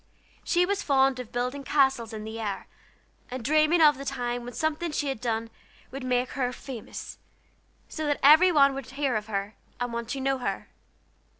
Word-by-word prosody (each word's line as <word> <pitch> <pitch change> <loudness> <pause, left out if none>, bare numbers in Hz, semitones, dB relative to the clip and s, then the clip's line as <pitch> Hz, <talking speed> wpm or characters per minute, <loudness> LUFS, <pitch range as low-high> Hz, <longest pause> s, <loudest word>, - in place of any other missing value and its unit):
She 355 0 +2
was 400 +1 -1
fond 270 -2 +3
of 250 -3 -7
building 250 +3 -2
castles 265 -5 +2
in 215 -1 -6
the 220 +1 -6
air, 205 -3 -4 0.6
and 250 -2 -6
dreaming 310 +3 +4
of 295 -3 +6
the - - -5
time 245 -3 -3
when 245 +1 -8
something 315 +2 -1
she 290 -1 -1
had 265 -4 -4
done 230 -1 -2 0.4
would 270 +1 -6
make 250 0 0
her 250 -3 -1
famous, 250 -2 -8 0.7
so 310 -1 -4
that 290 - 0
everybody 300 -1 +7
would 270 -2 -6
hear 275 -1 -1
of 215 0 -2
her, 200 0 -3 0.3
and 245 -1 -3
want 235 0 -4
to 275 - -3
know 270 0 0
her. 245 - -4
265 Hz, 185 wpm, -27 LUFS, 240-290 Hz, 0.7 s, everybody